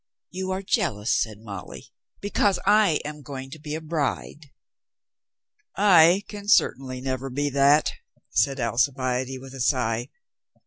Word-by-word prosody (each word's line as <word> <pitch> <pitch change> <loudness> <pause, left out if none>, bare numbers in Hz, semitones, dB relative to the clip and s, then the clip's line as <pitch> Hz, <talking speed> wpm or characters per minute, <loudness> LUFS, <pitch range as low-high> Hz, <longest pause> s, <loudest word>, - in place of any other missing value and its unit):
"You 185 +1 -4
are 190 +1 -3
jealous," 150 - 0
said 110 -2 -2
Molly, 100 -5 -9 0.3
"because 205 -1 +1
I 205 -5 +4
am 150 0 -7
going 135 -2 -8
to 160 - -9
be 150 0 -5
a 160 - -5
bride." 155 -1 -3 1.3
"I 185 -1 +6
can 205 -1 -9
certainly 130 - +2
never 130 0 -3
be 145 +3 -2
that," 140 +2 +4 0.4
said 140 -1 +1
Alcibiade 130 +2 0
with 135 0 -11
a 135 - -6
sigh. 120 -1 0
140 Hz, 135 wpm, -25 LUFS, 130-170 Hz, 1.3 s, I